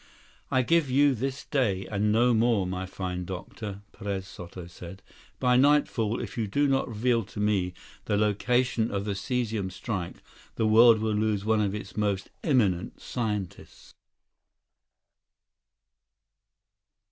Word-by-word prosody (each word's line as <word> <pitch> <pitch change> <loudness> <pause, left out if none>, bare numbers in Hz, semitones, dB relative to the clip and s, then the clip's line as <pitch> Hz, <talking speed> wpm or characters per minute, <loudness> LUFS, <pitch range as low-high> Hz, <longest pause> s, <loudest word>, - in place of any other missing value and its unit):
"I 130 -1 +2
give 165 +1 +2
you 140 +2 +4
this 135 +3 -4
day, 100 -9 0
and 105 +1 0
no 120 +3 +4
more, 115 -3 +2
my 95 +1 -4
fine 90 -1 -4
doctor," 95 +3 -7
Perez 100 -2 -4
Soto 90 0 -9
said. 90 +2 -11 0.4
"By 125 -1 +3
nightfall, 130 -5 +3
if 115 0 -6
you 110 - 0
do 145 +9 +1
not 135 -1 +1
reveal 115 +1 +1
to 105 +2 -9
me 100 -4 0 0.3
the 105 - +1
location 115 +3 +1
of 100 0 -2
the 105 - -1
cesium 110 -3 -2
strike, 95 -2 -5 0.3
the 110 - 0
world 115 +1 +7
will 110 -1 0
lose 105 -1 0
one 110 -1 +2
of 100 -1 0
its 105 - -7
most 100 -2 -1
eminent 105 - +1
scientists!" 105 -7 -5
105 Hz, 135 wpm, -27 LUFS, 95-120 Hz, 0.4 s, world